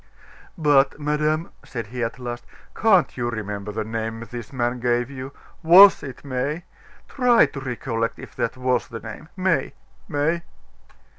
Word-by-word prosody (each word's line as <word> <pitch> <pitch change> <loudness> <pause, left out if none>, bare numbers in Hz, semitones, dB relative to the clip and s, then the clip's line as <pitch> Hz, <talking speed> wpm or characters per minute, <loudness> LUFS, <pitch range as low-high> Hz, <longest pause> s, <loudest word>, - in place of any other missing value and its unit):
"But, 145 -3 +3
madame," 150 +2 0
said 115 -4 -5
he 125 -1 -2
at 115 +2 -3
last, 120 -1 -6 0.3
"can't 190 - +3
you 120 -1 -2
remember 105 -2 -4
the 110 +1 -3
name 115 +1 -4
this 115 0 -8
man 120 -1 -1
gave 120 +1 0
you? 130 0 -7 0.3
Was 185 +5 +8
it 135 +1 -9
May? 140 +5 -2 0.4
Try 250 -3 +4
to 140 - -7
recollect 120 -3 -3
if - - -11
that 115 - -1
was 125 -1 0
the 115 - -7
name 115 +8 -9
May 185 -2 0 0.3
May!" 160 +3 0
130 Hz, 150 wpm, -23 LUFS, 115-150 Hz, 0.4 s, Was